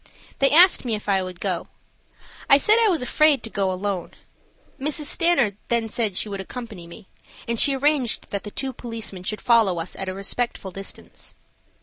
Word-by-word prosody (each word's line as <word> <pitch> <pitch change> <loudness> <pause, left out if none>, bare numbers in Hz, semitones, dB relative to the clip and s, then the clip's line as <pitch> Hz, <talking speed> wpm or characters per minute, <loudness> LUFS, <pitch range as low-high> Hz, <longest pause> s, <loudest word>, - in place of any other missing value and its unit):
They 275 - +4
asked 350 +5 +6
me 235 -4 -1
if 210 - -9
I 195 -2 +2
would 185 -1 -7
go. 185 -4 -2 0.8
I 275 - +8
said 425 +10 +3
I 450 -2 +4
was 330 -9 0
afraid 300 +2 +3
to 225 - -6
go 195 -2 0
alone. 185 -1 -3 0.7
Mrs. 300 +2 -2
Stanard 285 - +2
then 230 -1 0
said 215 -4 -1
she - - 0
would 200 -2 -5
accompany 215 -4 -8
me, 190 +4 -13 0.4
and 230 -1 0
she 275 - +5
arranged 275 -3 0
that 200 - -2
the 210 - -6
two 265 +5 -5
policemen 230 -6 -6
should 200 +2 -4
follow 225 -7 +3
us 165 +2 -5
at 195 -1 -4
a - - -4
respectful 200 0 -3
distance. 195 +1 -8
225 Hz, 190 wpm, -23 LUFS, 195-270 Hz, 0.8 s, I